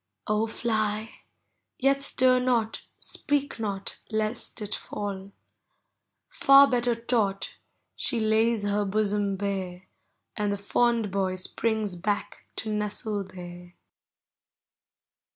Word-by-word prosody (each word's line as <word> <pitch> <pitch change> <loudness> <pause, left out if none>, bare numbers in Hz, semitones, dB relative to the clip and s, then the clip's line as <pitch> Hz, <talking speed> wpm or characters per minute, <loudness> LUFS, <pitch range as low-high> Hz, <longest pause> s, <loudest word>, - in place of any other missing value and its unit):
O, 215 +1 +1
Hy— 220 -1 -1 0.7
yet 275 +1 +2
stir 255 -2 +5
not, 240 -3 0
speak 285 -4 -1
not, 200 -3 -4
lest 215 +2 -1
it 210 -1 -3
fall. 200 -1 -5 0.5
— - - -53 0.2
Far 275 +1 +7
better 245 -2 +1
taught, 225 -4 -1 0.4
she 235 - -1
lays 220 0 +2
her 205 0 +1
bosom 205 0 0
bare. 190 -2 -3 0.5
And 210 -1 0
the 200 - -1
fond 230 +1 +1
boy 190 -1 0
springs 215 +1 -1
back 200 +4 -3
to 215 -1 -2
nestle 210 -1 -1
there. 175 -1 -10
215 Hz, 110 wpm, -27 LUFS, 200-230 Hz, 0.7 s, Far